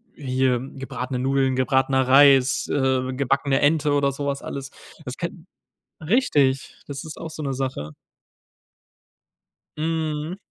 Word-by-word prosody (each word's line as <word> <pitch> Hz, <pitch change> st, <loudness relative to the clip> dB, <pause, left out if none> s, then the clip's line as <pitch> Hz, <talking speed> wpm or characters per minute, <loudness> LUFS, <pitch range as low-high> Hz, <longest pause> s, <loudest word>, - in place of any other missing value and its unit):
hier 130 Hz, -2 st, 0 dB
gebratene 130 Hz, -1 st, -5 dB
Nudeln, 135 Hz, 0 st, +1 dB
gebratener 130 Hz, 0 st, +2 dB
Reis, 135 Hz, -1 st, +5 dB
äh, 130 Hz, -2 st, +1 dB
gebackene 135 Hz, +1 st, +1 dB
Ente 150 Hz, 0 st, +2 dB
oder 140 Hz, -1 st, +2 dB
so 140 Hz, +1 st, -5 dB
was 140 Hz, 0 st, -2 dB
alles. 135 Hz, -1 st, -6 dB, 0.4 s
Das 125 Hz, -1 st, -6 dB
kann 170 Hz, 0 st, -6 dB, 0.5 s
richtig, 150 Hz, -, +1 dB
das 140 Hz, 0 st, -6 dB
ist 155 Hz, -, -8 dB
auch 165 Hz, -, -6 dB
so 155 Hz, -1 st, -7 dB
'ne 135 Hz, -1 st, -2 dB
Sache. 125 Hz, -, -4 dB, 1.8 s
Mhm. 160 Hz, +1 st, -2 dB
135 Hz, 125 wpm, -23 LUFS, 130-150 Hz, 1.8 s, Reis